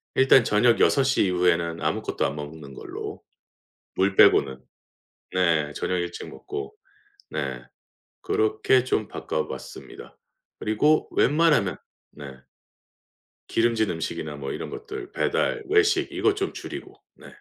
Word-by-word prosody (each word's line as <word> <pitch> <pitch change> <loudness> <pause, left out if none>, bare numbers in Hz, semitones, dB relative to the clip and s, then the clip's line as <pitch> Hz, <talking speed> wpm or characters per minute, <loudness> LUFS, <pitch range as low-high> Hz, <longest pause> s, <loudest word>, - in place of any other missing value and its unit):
일단 130 -2 +6
저녁 115 +3 +3
6 140 - +4
시 135 -4 +2
이후에는 85 -2 +1
아무것도 - - -1
안 70 - -2
먹는 75 -1 -8
걸로 - - -7 0.8
물 95 +1 +1
빼고는. 65 -1 +5 0.8
네 80 -5 +2
저녁 90 - -2
일찍 85 0 -4
먹고 410 +2 -7 0.6
네 - - -3 0.6
그렇게 415 - +2
좀 110 -4 0
바꿔봤습니다. - - -6 0.4
그리고 150 +9 +2
웬만하면 150 - +3 0.4
네. 70 -3 -10 1.1
기름진 115 -2 +1
음식이나 80 -2 -4
뭐 70 -1 -5
이런 - - -6
것들 420 -2 -8
배달, 485 -3 0
외식 430 +1 +3
이것 410 - +2
좀 390 -1 -2
줄이고. - - -9 0.2
네. - - -15
110 Hz, 245 characters per minute, -25 LUFS, -, 1.1 s, 일단